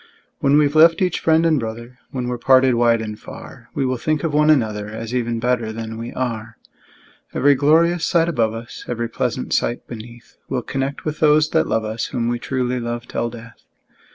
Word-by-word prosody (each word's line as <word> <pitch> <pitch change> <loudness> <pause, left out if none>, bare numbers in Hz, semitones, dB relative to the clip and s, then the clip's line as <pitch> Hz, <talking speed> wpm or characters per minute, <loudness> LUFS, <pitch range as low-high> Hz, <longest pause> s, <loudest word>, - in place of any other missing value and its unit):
When 140 -1 +3
we've 145 -1 +3
left 165 +1 +6
each 180 -2 0
friend 160 0 +3
and 160 -3 +3
brother, 115 +2 -7
When 125 -2 -4
we're 125 -1 -3
parted 130 0 +5
wide 115 -1 +3
and 105 0 -6
far, 120 +1 -11
We 140 -3 0
will 130 0 -1
think 155 +3 -1
of 160 -3 -1
one 150 +1 +4
another, 110 -8 +2
As 110 +2 -6
even 120 -2 -1
better 120 -2 0
than 110 0 -6
we 115 +1 -6
are. 115 -3 -4 0.8
Every 145 +2 +5
glorious 165 +5 +3
sight 170 -2 +2
above 115 -9 0
us, 115 0 -8
Every 120 -1 -2
pleasant 115 - -2
sight 120 - 0
beneath, 120 +1 -11
We'll 125 -2 -2
connect 135 +3 -3
with 155 -1 -3
those 155 0 +4
that 160 - +2
love 110 -1 0
us, 110 +1 -3
Whom 120 -1 -2
we 120 0 -1
truly 125 -1 -2
love 120 0 -4
till 120 - -2
death! 115 -1 -12
125 Hz, 200 wpm, -20 LUFS, 115-150 Hz, 0.8 s, left